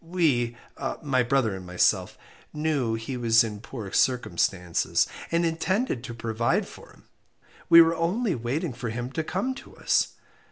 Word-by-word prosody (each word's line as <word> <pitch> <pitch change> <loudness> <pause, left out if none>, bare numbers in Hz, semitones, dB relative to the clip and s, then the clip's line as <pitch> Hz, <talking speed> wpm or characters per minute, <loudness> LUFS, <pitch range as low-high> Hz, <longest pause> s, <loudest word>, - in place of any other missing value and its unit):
We 145 -9 +1 0.5
my 135 -4 +2
brother 120 -4 +1
and 95 - -8
myself 90 0 +1 0.4
knew 150 -7 0
he 115 +3 -5
was 115 -1 +4
in 105 -2 -5
poor 110 -5 -7
circumstances, 90 -7 +1 0.3
and 170 +1 +2
intended 165 - -1
to 120 - -7
provide 115 0 0
for - - -13
him. - - -20 0.7
We 170 0 +10
were 165 +1 +1
only 185 +6 0
waiting 130 +5 -2
for 120 -1 -5
him 120 +3 -4
to 160 - -2
come 200 +11 -2
to 265 - -13
us. - - +1
125 Hz, 155 wpm, -26 LUFS, 115-165 Hz, 0.7 s, We